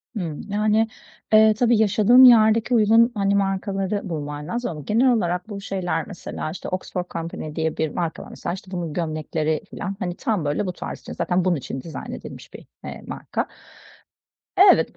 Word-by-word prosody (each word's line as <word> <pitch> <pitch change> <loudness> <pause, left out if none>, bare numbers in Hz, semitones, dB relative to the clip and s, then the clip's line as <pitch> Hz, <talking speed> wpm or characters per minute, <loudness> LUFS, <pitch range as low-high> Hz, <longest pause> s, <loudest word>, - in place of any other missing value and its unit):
Hımm. 165 -7 -4
Yani, 215 +2 +2 0.5
eee, 215 0 +7
tabii 235 +1 +3
yaşadığın 220 +4 +6
yerdeki 230 -1 +6
uygun, 230 +1 +5
hani, 200 -1 +1
markaları 195 0 -1
bulman 150 -2 -5
lazım 240 +5 -2
ama 150 -2 -7
genel 230 - +3
olarak 180 -3 -1
bu 200 -2 -6
şeyler 180 -5 -2
mesela, 175 -4 -6
işte, 180 - -7
Oxford 185 -1 -3
Company 165 -2 -5
diye 160 -1 -1
bir 160 - 0
marka 165 +1 -3
var. - - -12
Mesela, 170 - -5
işte, 190 0 -10
bunun 175 -4 -4
gömlekleri 155 -1 -2
filan, 195 -1 -5
hani, 175 -1 -3
tam, 210 - -1
böyle, 145 +7 0
bu 180 - -3
tarz - - -7
için, - - -9
zaten 180 0 0
bunun 180 -2 +3
için 135 -2 -5
dizayn 155 0 -7
edilmiş - - -9
bir, - - -11 0.2
eee, - - -7
marka. - - -4 1.3
Evet, - - 0
190 Hz, 175 wpm, -23 LUFS, 165-215 Hz, 1.3 s, eee